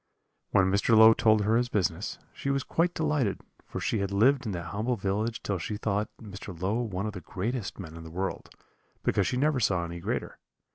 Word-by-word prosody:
"When 95 0 +3
Mr. 100 +3 +4
Low 110 +1 +9
told 110 -1 +4
her 110 +2 +2
his 120 0 +1
business, 95 -3 -1 0.2
she 140 - -4
was 140 -1 +1
quite 175 +1 0
delighted, 150 -10 0 0.3
for - - -5
she 110 - 0
had 100 -1 -1
lived 125 +6 +3
in - - -1
that 85 -1 -5
humble 115 +5 0
village 105 +3 -2
till 100 -3 -1
she 105 +5 -3
thought 105 -1 -1
Mr. 100 -5 -9
Low 100 +6 0
one 100 -4 -3
of 105 - -3
the 90 - -7
greatest 105 +6 -3
men 85 -5 -8
in 80 - -9
the 80 - -9
world, 95 +4 -4 0.5
because - - +2
she 125 - -1
never 145 0 +2
saw 95 -6 +1
any 85 0 -6
greater. - - -3
105 Hz, 210 wpm, -28 LUFS, 95-120 Hz, 0.5 s, Low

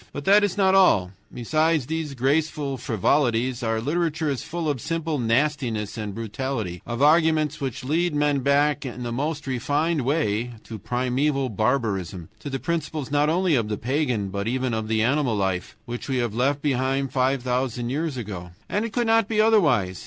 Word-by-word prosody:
But 145 - -6
that 205 +2 +6
is 205 -1 0
not 190 -1 +4
all; 105 - +4 0.2
besides 155 +4 +1
these 160 -1 -3
graceful 140 +1 0
frivolities, 120 +1 +1
our 115 -1 0
literature 155 +3 -1
is 135 - -3
full 170 -1 -4
of 140 -5 -1
simple 165 -2 -2
nastiness 120 -3 0
and 105 -3 -5
brutality, 110 -4 -4
of 120 +3 -1
arguments 155 -1 +3
which 135 -1 -4
would 130 - -5
lead 170 0 +1
men 145 -1 +2
back 145 +2 +2
in 125 -2 -6
the 120 - -3
most 150 +5 -2
refined 145 +5 0
way 120 -4 0
to 110 -2 -8
primeval 130 +4 0
barbarism, 100 -7 -1
to 145 - -6
the 135 - -2
principles 155 -2 -3
not 145 +1 +3
only 180 +1 +2
of 115 -6 +2
the 105 - -2
pagan, 125 -5 -1
but 100 +2 -3
even 130 0 -1
of 110 -1 -2
the 110 0 +1
animal 130 -1 +1
life, 95 -3 -2
which 120 +2 -6
we 130 - 0
have 120 -4 -1
left 135 +5 0
behind 135 -1 0
us - - -21
five 130 -1 +1
thousand 125 -1 -1
years 150 0 -2
ago. 95 -7 -6 0.2
And 210 +2 -1
it 230 - -6
could 240 -1 +1
not 225 -2 +3
be 215 -1 -1
otherwise. 150 - +3
135 Hz, 190 wpm, -24 LUFS, 115-155 Hz, 0.2 s, that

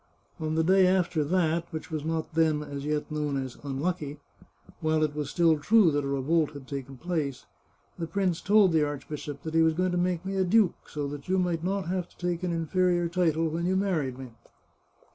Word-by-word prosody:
" - - -37
On 155 0 -1
the 160 - +2
day 190 +2 +5
after 180 -4 +2
that 170 +1 +1
which 160 +1 -6
was 155 -2 -3
not 160 +1 -3
then, 155 -2 +2
as 140 -1 -6
yet, 150 0 -2
known 150 -2 -1
as 130 -2 -4
* - - -20
unlucky,' 145 +1 -3 0.6
while 155 0 +1
it 150 -1 0
was 150 -1 -3
still 165 -2 +3
true 205 +2 +5
that 145 0 0
a - - -3
revolt 150 +3 +1
had 140 -2 -10
taken 135 -1 -6
place, 155 -5 -3 0.5
the 165 - -2
prince 185 -2 0
told 205 -2 +5
the 160 -2 +3
archbishop 145 0 -5
that 160 - -5
he 165 - +4
was 160 -1 +3
going 185 +1 +1
to 175 - 0
make 180 0 0
me 195 0 -2
a 190 - +3
duke, 195 0 +2
so 145 -1 -3
that 145 +3 -8
you 190 - +2
might 175 -3 0
not 190 -1 -1
have 180 0 -2
to - - -25
take 175 -1 -2
an 180 -1 -1
inferior 175 +1 +1
title 165 -2 +1
when 165 +2 -2
you 190 - +1
married 165 -10 0
me. 130 -2 -9
160 Hz, 220 wpm, -28 LUFS, 150-180 Hz, 0.6 s, day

